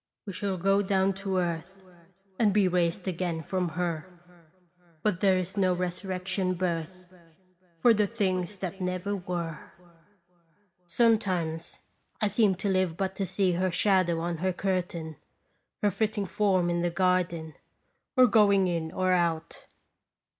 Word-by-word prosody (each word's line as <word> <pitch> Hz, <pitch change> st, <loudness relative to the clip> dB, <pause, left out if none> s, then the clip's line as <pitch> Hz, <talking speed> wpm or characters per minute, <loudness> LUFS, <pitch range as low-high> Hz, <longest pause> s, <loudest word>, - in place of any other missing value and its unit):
" -, -, -64 dB
We 200 Hz, -, -6 dB
shall 195 Hz, 0 st, -2 dB
go 195 Hz, +3 st, +3 dB
down 195 Hz, -1 st, +2 dB
to 195 Hz, -1 st, -1 dB
earth, 180 Hz, +2 st, -3 dB, 0.6 s
And 215 Hz, -3 st, +4 dB
be 200 Hz, -1 st, +3 dB
raised 175 Hz, +1 st, 0 dB
again 170 Hz, -2 st, -2 dB
from 185 Hz, -1 st, -1 dB
her; 170 Hz, -1 st, -2 dB, 1.0 s
But 200 Hz, -4 st, 0 dB
there 190 Hz, -2 st, +4 dB
is 185 Hz, +1 st, -4 dB
no 185 Hz, -2 st, +3 dB
resurrection 185 Hz, +1 st, -2 dB
birth 180 Hz, +1 st, -4 dB, 0.7 s
For 240 Hz, -, +6 dB
the 210 Hz, -1 st, +2 dB
things 190 Hz, -3 st, -1 dB
that 190 Hz, 0 st, -6 dB
never 185 Hz, +2 st, -2 dB
were." 175 Hz, -4 st, -4 dB, 1.3 s
Sometimes 185 Hz, -7 st, +1 dB, 0.4 s
I 215 Hz, -, +1 dB
seem 205 Hz, -2 st, +3 dB
to 195 Hz, +3 st, -3 dB
live 185 Hz, -3 st, +1 dB
but 190 Hz, -1 st, -2 dB
to 195 Hz, -, -1 dB
see 190 Hz, +1 st, +1 dB
her 185 Hz, +2 st, +1 dB
shadow 180 Hz, -2 st, +2 dB
on 170 Hz, 0 st, -2 dB
her 185 Hz, +3 st, 0 dB
curtain, 175 Hz, -4 st, -2 dB, 0.7 s
her 205 Hz, -, +4 dB
flitting 210 Hz, 0 st, -1 dB
form 185 Hz, -3 st, +1 dB
in 170 Hz, 0 st, 0 dB
the 175 Hz, -, +1 dB
garden, 170 Hz, -3 st, 0 dB, 0.6 s
or 255 Hz, -, +8 dB
going 200 Hz, -4 st, +4 dB
in 165 Hz, -2 st, -2 dB
or 185 Hz, +1 st, 0 dB
out. 170 Hz, -2 st, -1 dB
185 Hz, 145 wpm, -28 LUFS, 175-195 Hz, 1.3 s, or